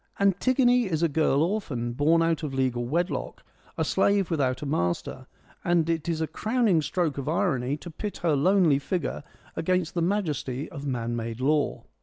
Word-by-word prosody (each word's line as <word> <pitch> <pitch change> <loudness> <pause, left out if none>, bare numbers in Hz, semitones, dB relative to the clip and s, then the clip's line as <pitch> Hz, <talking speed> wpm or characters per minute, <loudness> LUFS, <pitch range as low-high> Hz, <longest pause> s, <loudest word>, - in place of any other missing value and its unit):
' - - -26
Antigone 245 +5 +3
is 165 -2 -1
a - - +5
girl 150 -1 +2
orphan, 145 - -2
born 160 +6 +3
out 165 -1 +1
of 145 -4 -4
legal 125 -2 0
wedlock, 170 +7 -2 0.3
a - - +1
slave 200 -3 +2
without 130 -4 0
a - - -3
master; 90 - -2 0.4
and 170 -2 +2
it 165 0 -2
is 160 -1 -1
a - - +2
crowning 215 -2 +1
stroke 155 -2 -1
of 140 - -3
irony 145 -7 0
to 175 - -9
pit 205 +6 -5
her 160 -4 +3
lonely 165 -1 +4
figure 150 +3 -3 0.3
against 180 0 0
the 170 - -1
majesty 155 -8 -1
of 145 -3 -6
man 120 -3 -2
made 115 0 -4
law. 145 +3 +1
160 Hz, 180 wpm, -26 LUFS, 135-180 Hz, 0.4 s, a